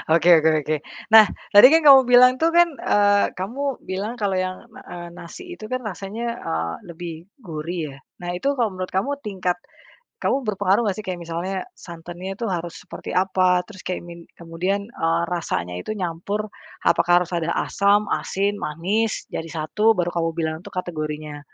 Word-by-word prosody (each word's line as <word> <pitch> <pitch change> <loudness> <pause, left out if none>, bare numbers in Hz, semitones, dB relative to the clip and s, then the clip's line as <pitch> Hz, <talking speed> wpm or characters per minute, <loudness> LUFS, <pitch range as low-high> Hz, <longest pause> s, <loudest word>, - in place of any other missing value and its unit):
Oke 170 +1 +3
oke 160 +1 +3
oke 155 +2 0 0.3
nah 220 -1 +9 0.2
tadi 205 +4 +10
kan 320 +4 +5
kamu 275 -2 +9
bilang 250 +1 +6
tuh 330 +1 +2
kan, 345 0 +6
eee, 205 0 +3
kamu 260 +8 -4
bilang 200 +5 -4
kalo 205 -5 -1
yang, 185 0 -3
na - - -13
eee, 175 -1 -7
nasi 175 - -10 0.2
itu 215 - -7
kan 255 +2 -3
rasanya, 205 +2 -6 0.2
eee, 80 +1 -3
lebih 170 -1 -7 0.3
gurih 165 0 -5
ya 135 - -13 0.3
nah 175 - -3
itu 275 +11 -1
kalo 235 -5 0
menurut 185 0 -5
kamu 200 +9 0
tingkat, 185 -7 -2 0.6
kamu 270 -1 0
berpengaruh 205 +1 +1
nggak 200 -3 0
sih? - - -11
Kayak 180 -2 -4
misalnya 170 +4 -3 0.2
santannya 175 +2 -8
itu 235 - -4
harus 175 -2 -4
seperti - - -8
apa 185 -1 +2
terus 200 -4 -13
kayak 180 -1 -4
min 170 0 -10 0.2
kemudian, 180 +4 -2
eee, 165 -6 -1
rasanya 90 - -3
itu 215 - -5
nyampur, 200 +4 -3 0.3
apakah 175 0 +4
harus 175 - -15
ada 170 -2 -1
asam, 200 +2 +2 0.2
asin, 200 +1 -1
manis, 195 +8 -1
jadi 165 - -4
1 210 +8 +1
baru 175 -1 -1
kamu 165 -1 0
bilang 160 -1 -1
tuh - - -11
kategorinya, 155 -4 -4
185 Hz, 175 wpm, -22 LUFS, 170-210 Hz, 0.6 s, tadi